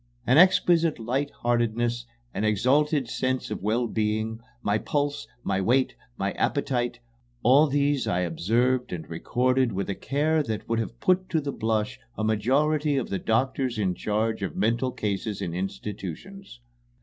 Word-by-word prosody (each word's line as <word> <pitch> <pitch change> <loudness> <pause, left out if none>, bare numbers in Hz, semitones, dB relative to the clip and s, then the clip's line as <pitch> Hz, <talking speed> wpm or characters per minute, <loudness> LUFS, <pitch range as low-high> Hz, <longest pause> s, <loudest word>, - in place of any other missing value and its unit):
An 130 +5 +5
exquisite 170 -3 +4
light 130 +5 -1
heartedness, 120 0 -1 0.3
an - - -2
exalted 130 +6 +2
sense 130 0 -2
of 105 - -4
wellbeing, 110 0 -1 0.2
my 105 +1 +1
pulse, 145 +2 -2 0.2
my 95 - 0
weight, 130 +6 +2 0.2
my 100 +1 -1
appetite 120 -3 -1 0.5
all 140 +6 +6
these 145 -1 +1
I 90 - +1
observed 120 +9 +1
and 85 -3 -6
recorded 125 +8 +1
with 100 +1 -2
a - - -1
care 155 +8 0
that 110 -7 -4
would 115 0 0
have 115 +1 -4
put 185 0 +2
to 160 - +1
the 140 -2 -3
blush 110 0 -1 0.2
a 110 - -2
majority 140 +7 +2
of 130 - -2
the 95 - -2
doctors 130 +1 0
in 95 -4 +1
charge 110 +3 -1
of 95 -6 -3
mental 115 +6 +1
cases 105 -2 -3
in 85 - -3
institutions. 105 - -6
120 Hz, 150 wpm, -26 LUFS, 105-140 Hz, 0.5 s, all